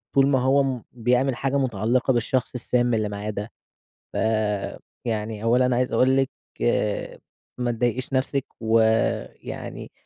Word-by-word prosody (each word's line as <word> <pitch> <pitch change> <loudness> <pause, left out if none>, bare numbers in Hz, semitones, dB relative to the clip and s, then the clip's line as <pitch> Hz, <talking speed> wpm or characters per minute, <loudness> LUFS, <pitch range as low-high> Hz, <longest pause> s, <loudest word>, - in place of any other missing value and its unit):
طول 135 0 +6
ما 135 -2 +3
هو 135 +2 +4
م 130 -4 -2
بيعمل 125 +2 +2
حاجة 135 +2 0
مُتعلقة 125 +2 +1
بالشخص 120 +1 0
السام 120 0 +1
اللي 110 -2 +1
معاه 105 +1 -4
ده. 105 +2 -5 0.6
ف - - -3 0.9
يعني، 110 -2 -2
أولًا، 125 +2 +3
عايز 125 0 +1
أقول 130 +1 +4
لِك، 135 0 +2 1.3
ما 120 -1 +1
تضايقش 120 +3 -1
نَفسِك، 135 +1 0 0.2
ويعني 110 0 0
125 Hz, 130 wpm, -24 LUFS, 110-130 Hz, 1.3 s, طول